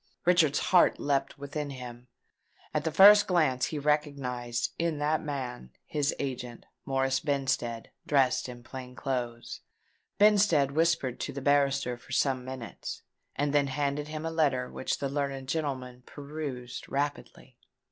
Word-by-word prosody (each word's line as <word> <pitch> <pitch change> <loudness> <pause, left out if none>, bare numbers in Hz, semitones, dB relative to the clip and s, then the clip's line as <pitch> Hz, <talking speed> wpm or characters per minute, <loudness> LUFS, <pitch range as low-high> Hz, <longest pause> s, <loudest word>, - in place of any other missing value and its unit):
Richard's 170 -5 +4
heart 180 -2 +4
leapt 140 -1 0
within 145 +1 -5
him: 125 -2 -9 0.7
at 150 0 -1
the 160 - 0
first 205 +5 +8
glance 155 -9 +2
he 155 - -4
recognised, 140 -5 -1
in 165 -2 0
that 150 +1 +1
man, 130 - -5 0.2
his 145 -1 0
agent, 125 -3 -5 0.2
Morris 135 0 +1
Benstead, 135 -6 -1 0.2
dressed 135 -3 +2
in 120 -1 -10
plain 125 0 -9
clothes. 120 -4 -4 0.6
Benstead 200 -9 +4
whispered 155 -5 +1
to - - -3
the 140 - -5
barrister 140 -3 +2
for 135 - -11
some 130 -1 +1
minutes, 130 -3 -7 0.3
and 145 0 0
then 145 -1 +3
handed 145 +1 -2
him 155 +1 -5
a 165 - -2
letter 140 -6 +1
which - - -2
the 140 - -2
learned 135 -1 -3
gentleman 130 -4 -3
perused 140 -4 -6
rapidly. 145 +1 -4
140 Hz, 140 wpm, -29 LUFS, 130-150 Hz, 0.7 s, first